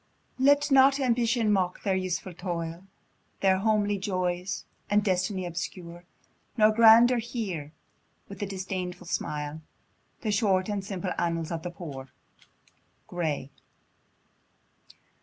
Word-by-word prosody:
Let 285 +2 +4
not 270 +1 +6
Ambition 235 -3 +2
mock 185 -3 0
their 195 - +1
useful 185 0 -3
toil, 170 0 -5 0.6
Their 190 -1 +3
homely 205 -1 +1
joys, 185 -1 -2 0.2
and 210 0 +3
destiny 185 -1 0
obscure; 175 0 -6 0.5
Nor 215 -1 +6
Grandeur 230 +2 +7
hear, 200 - -4 0.6
with 200 0 -10
a 205 - -1
disdainful 185 -2 -5
smile, 150 -2 -3 0.6
The 220 - -1
short 200 -2 +2
and 205 -2 -2
simple 190 -1 -4
annals 165 -1 -1
of 165 -1 -3
the 175 - -5
Poor. 145 -7 -8 1.0
Gray. 155 -6 -3
190 Hz, 115 wpm, -27 LUFS, 175-215 Hz, 1.0 s, Grandeur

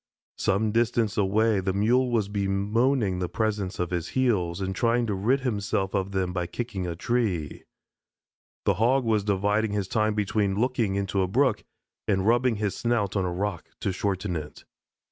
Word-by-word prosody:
Some 105 +2 +1
distance 115 -2 +1
away 105 +1 +2
the 95 0 -1
Mule 120 +6 +2
was 115 -4 +1
bemoaning 100 +2 +1
the 90 -1 -2
presence 105 -4 -2
of 90 -1 -2
his 85 -1 -2
heels 100 -10 +1
and 95 0 -3
trying 115 +3 +2
to 105 - -1
rid 115 +8 +1
himself 100 -5 -1
of 100 -1 -1
them 95 -2 -1
by 90 -2 -2
kicking 100 -2 -4
a 85 - -3
tree. 95 -7 -1 1.0
The - - +4
Hog 130 +3 +3
was 110 -3 +2
dividing 105 +2 +1
his 100 -2 -1
time 110 0 +1
between 105 -1 0
looking 120 -5 +1
into 100 0 0
a 95 - +1
brook 130 +7 +1 0.4
and 95 -2 +1
rubbing 120 +1 +3
his 105 -2 -2
snout 115 -5 0
on 95 -2 +1
a 90 - -1
rock 95 0 -3
to - - 0
shorten 95 -1 -2
it. 75 -2 -7
100 Hz, 175 wpm, -26 LUFS, 95-115 Hz, 1.0 s, The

